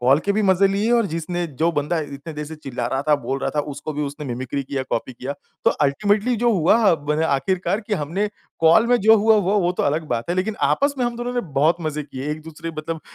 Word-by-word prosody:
Call 130 Hz, +4 st, +4 dB
के 200 Hz, -, +2 dB
भी 215 Hz, +2 st, +1 dB
मज़े 190 Hz, 0 st, +4 dB
लिए 205 Hz, +4 st, 0 dB
और 235 Hz, -3 st, +3 dB
जिसने 170 Hz, +1 st, -3 dB
जो 165 Hz, +1 st, +4 dB
बंदा 150 Hz, +3 st, 0 dB
इतने 145 Hz, +1 st, -7 dB
देर 150 Hz, 0 st, -5 dB
से 160 Hz, +1 st, -8 dB
चिल्ला 135 Hz, -4 st, -4 dB
रहा 135 Hz, +1 st, -1 dB
था, 150 Hz, -, +6 dB
बोल 135 Hz, 0 st, -3 dB
रहा 135 Hz, -, -2 dB
था -, -, +4 dB
उसको 145 Hz, +2 st, -6 dB
भी 150 Hz, 0 st, -2 dB
उसने 145 Hz, +1 st, -5 dB
मिमिक्री 130 Hz, +2 st, -3 dB
किया 135 Hz, 0 st, -3 dB
कॉपी 130 Hz, +3 st, -2 dB
किया। 130 Hz, +3 st, -5 dB, 0.3 s
तो -, -, +6 dB
अल्टीमेटली 205 Hz, -, +1 dB
जो 240 Hz, +2 st, +2 dB
हुआ 195 Hz, +2 st, +4 dB
बने 150 Hz, +1 st, -1 dB
आखिरकार 180 Hz, -, 0 dB
कि 215 Hz, -1 st, -2 dB
हमने, 180 Hz, +5 st, -1 dB, 0.3 s
कॉल 165 Hz, +8 st, +5 dB
में 245 Hz, -, +4 dB
जो 220 Hz, +3 st, +6 dB
हुआ 220 Hz, +1 st, +4 dB
वो, 205 Hz, +1 st, +2 dB
वो 175 Hz, -1 st, +1 dB
तो -, -, -2 dB
अलग 155 Hz, +3 st, 0 dB
बात 120 Hz, +7 st, -2 dB
है -, -, +1 dB
लेकिन 210 Hz, +4 st, -1 dB
आपस 285 Hz, 0 st, +2 dB
में 250 Hz, -, +1 dB
हम 240 Hz, 0 st, -2 dB
दोनों 240 Hz, +1 st, -3 dB
ने 245 Hz, -, +1 dB, 0.2 s
बहुत 155 Hz, +4 st, +4 dB
मज़े 155 Hz, -1 st, -3 dB
किए, 140 Hz, 0 st, -6 dB
एक-दूसरे 155 Hz, +1 st, -6 dB
मतलब 160 Hz, +1 st, -4 dB
160 Hz, 245 wpm, -22 LUFS, 145-205 Hz, 0.3 s, था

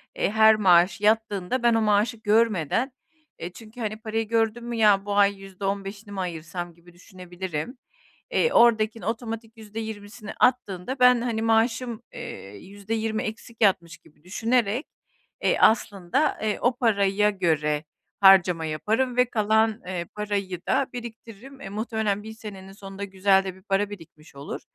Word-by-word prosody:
Eee, -, -, 0 dB
her 220 Hz, 0 st, +6 dB
maaş 180 Hz, -2 st, +4 dB
yattığında 215 Hz, +1 st, +1 dB
ben 235 Hz, -1 st, +4 dB
o 225 Hz, -, +2 dB
maaşı 215 Hz, +2 st, +2 dB
görmeden, 220 Hz, -, +1 dB, 0.5 s
eee, 170 Hz, -, -6 dB
çünkü, 225 Hz, +3 st, -13 dB
hani, 215 Hz, -2 st, -3 dB
parayı 225 Hz, 0 st, -3 dB
gördün 225 Hz, +1 st, 0 dB
mü 240 Hz, 0 st, -4 dB
ya 205 Hz, -3 st, +4 dB
bu 205 Hz, 0 st, -2 dB
ay 200 Hz, -1 st, +3 dB
yüzde 195 Hz, 0 st, -8 dB
15'ini 200 Hz, +1 st, -4 dB
mi 195 Hz, -, -5 dB
ayırsam 175 Hz, 0 st, -5 dB
gibi 170 Hz, +1 st, -20 dB
düşünebilirim, 180 Hz, -, -7 dB, 0.5 s
eee, 475 Hz, 0 st, +2 dB
oradakini 225 Hz, -1 st, +3 dB
otomatik 225 Hz, 0 st, -5 dB
%20'si 220 Hz, 0 st, -8 dB
attığında 250 Hz, -1 st, 0 dB
ben, 250 Hz, -1 st, +6 dB
hani, 235 Hz, -2 st, -2 dB
maaşım, 225 Hz, +1 st, +1 dB
eee, 235 Hz, -, -8 dB
%20 215 Hz, -, -4 dB
eksik 225 Hz, +1 st, -8 dB
yatmış 170 Hz, -5 st, +2 dB
gibi 150 Hz, +1 st, -25 dB
düşünerek, 225 Hz, -, 0 dB, 0.6 s
eee, -, -, +2 dB
aslında, 220 Hz, -, +2 dB
eee, 215 Hz, -1 st, -1 dB
o 245 Hz, 0 st, +2 dB
paraya 210 Hz, -3 st, +2 dB
göre 155 Hz, -6 st, 0 dB, 0.4 s
harcama 185 Hz, -4 st, +6 dB
yaparım 220 Hz, +11 st, -1 dB
ve 250 Hz, -, +5 dB
kalan, 220 Hz, -1 st, +1 dB
eee, 180 Hz, -2 st, -3 dB
parayı 200 Hz, -4 st, -3 dB
da 275 Hz, -, +2 dB
biriktiririm. 235 Hz, +2 st, -10 dB
Eee, 195 Hz, -, -7 dB
muhtemelen 210 Hz, -1 st, -2 dB
1 220 Hz, -, -8 dB
senenin 200 Hz, -3 st, -10 dB
sonunda 195 Hz, 0 st, -9 dB
güzel 195 Hz, 0 st, +2 dB
de 190 Hz, -1 st, -6 dB
bir 190 Hz, -, -18 dB
para 195 Hz, +1 st, 0 dB
birikmiş 160 Hz, -7 st, -13 dB
olur. 140 Hz, +1 st, -7 dB
210 Hz, 150 wpm, -25 LUFS, 190-225 Hz, 0.6 s, her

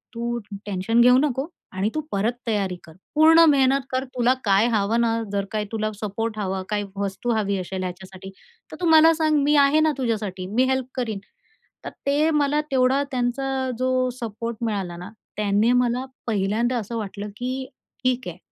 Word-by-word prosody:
तू 235 Hz, +1 st, -2 dB, 0.3 s
tension 205 Hz, +4 st, +1 dB
घेऊ 250 Hz, +1 st, +7 dB
नको 270 Hz, 0 st, 0 dB, 0.2 s
आणि 190 Hz, +3 st, -1 dB
तू 310 Hz, -, 0 dB
परत 210 Hz, +5 st, 0 dB
तयारी 200 Hz, -4 st, 0 dB
कर. 160 Hz, -, -14 dB, 0.2 s
पूर्ण 320 Hz, +2 st, +7 dB
मेहनत 270 Hz, -1 st, +3 dB
कर, 260 Hz, 0 st, 0 dB
तुला 245 Hz, 0 st, +3 dB
काय 200 Hz, +2 st, +3 dB
हवं 215 Hz, +3 st, +2 dB
ना, 230 Hz, -1 st, +2 dB, 0.2 s
जर 200 Hz, -1 st, 0 dB
काय 215 Hz, -1 st, -1 dB
तुला 215 Hz, -1 st, -1 dB
सपोर्ट 215 Hz, +1 st, -3 dB
हवा, 190 Hz, -2 st, -2 dB
काही 210 Hz, -1 st, -1 dB
वस्तू 200 Hz, +4 st, -2 dB
हवी 200 Hz, -2 st, 0 dB
असेल 185 Hz, +1 st, -4 dB
ह्याच्यासाठी, 185 Hz, +1 st, -8 dB, 0.4 s
तर -, -, -7 dB
तू -, -, 0 dB
मला 320 Hz, +1 st, +7 dB
सांग. 310 Hz, -1 st, +2 dB
मी 295 Hz, +1 st, +3 dB
आहे 295 Hz, +3 st, +3 dB
ना 310 Hz, 0 st, +3 dB
तुझ्यासाठी. 210 Hz, -7 st, -2 dB
मी 250 Hz, +3 st, +3 dB
हेल्प 260 Hz, -1 st, 0 dB
करीन." 225 Hz, -5 st, -2 dB, 0.7 s
तर -, -, -3 dB, 0.2 s
ते 295 Hz, +3 st, +3 dB
मला 295 Hz, 0 st, +2 dB
तेवढा 265 Hz, +1 st, +3 dB
त्यांचा 260 Hz, +1 st, -1 dB
जो 255 Hz, 0 st, +1 dB
सपोर्ट 230 Hz, +1 st, -4 dB
मिळाला 195 Hz, -6 st, -3 dB
ना, 180 Hz, +2 st, -8 dB, 0.3 s
त्यानी 210 Hz, +2 st, +2 dB
मला 245 Hz, +2 st, -1 dB, 0.2 s
पहिल्यांदा 220 Hz, +4 st, 0 dB
असं 230 Hz, +1 st, -4 dB
वाटलं 205 Hz, -1 st, -5 dB
की 255 Hz, +2 st, -3 dB, 0.4 s
"ठीक 255 Hz, -2 st, 0 dB
आहे. 175 Hz, 0 st, -6 dB
235 Hz, 175 wpm, -23 LUFS, 200-260 Hz, 0.7 s, घेऊ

